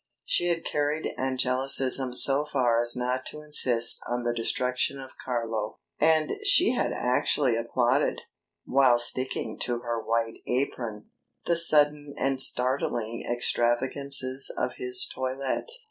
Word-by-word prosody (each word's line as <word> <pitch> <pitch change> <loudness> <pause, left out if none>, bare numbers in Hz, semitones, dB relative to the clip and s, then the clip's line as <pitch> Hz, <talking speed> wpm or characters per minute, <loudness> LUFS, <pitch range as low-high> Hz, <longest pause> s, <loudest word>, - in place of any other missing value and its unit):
She 175 - +1
had 170 -1 -2
carried 150 +1 -3
angelicism 130 0 +2
so 140 +3 +4
far 120 -4 +1
as 120 +1 +2
not 125 +1 -3
to 150 - -9
insist 125 -6 +5
on 120 0 -4
the 120 0 -2
destruction 125 +3 -2
of 130 -1 -11
Carlo; 115 -4 -4 0.2
and 155 0 +2
she 405 -3 +5
had 250 - -2
actually 125 0 -1
applauded, 120 +4 -1 0.4
while 130 -2 +3
sticking 120 -2 -2
to 120 -1 -3
her 120 -1 -4
white 115 0 -3
apron, 120 -4 -4 0.3
the 170 - +1
sudden 150 -3 +4
and 135 -1 +2
startling 125 -3 +1
extravagances 130 +3 0
of - - -4
his 385 0 -2
toilette. 130 - -5
130 Hz, 130 wpm, -25 LUFS, 120-140 Hz, 0.4 s, insist